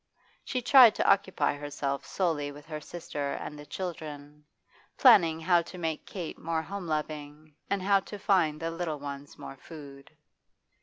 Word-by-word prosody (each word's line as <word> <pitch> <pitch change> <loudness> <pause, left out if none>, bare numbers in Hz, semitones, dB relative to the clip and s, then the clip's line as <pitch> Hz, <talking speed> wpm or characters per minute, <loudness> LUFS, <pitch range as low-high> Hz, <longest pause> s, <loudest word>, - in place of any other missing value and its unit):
She 255 -2 -3
tried 250 -3 +8
to - - 0
occupy 195 -4 +3
herself 145 -1 -3
solely 155 -6 -1
with 145 +1 -12
her 155 -1 -6
sister 145 -4 -5
and - - -6
the 145 - -11
children, 150 -4 -7 0.5
planning 170 -11 +6
how 175 +1 +3
to 175 +2 -10
make 160 -3 -3
Kate 175 -5 -6
more 165 0 -2
home 195 +1 -6
loving 150 0 -4 0.2
and 200 -2 0
how 200 0 +4
to 205 +2 -9
find 175 -7 +2
the 165 0 -3
little 165 -2 -3
ones 140 0 -8
more 135 - -9
food. 140 -2 -12
160 Hz, 160 wpm, -29 LUFS, 145-180 Hz, 0.5 s, tried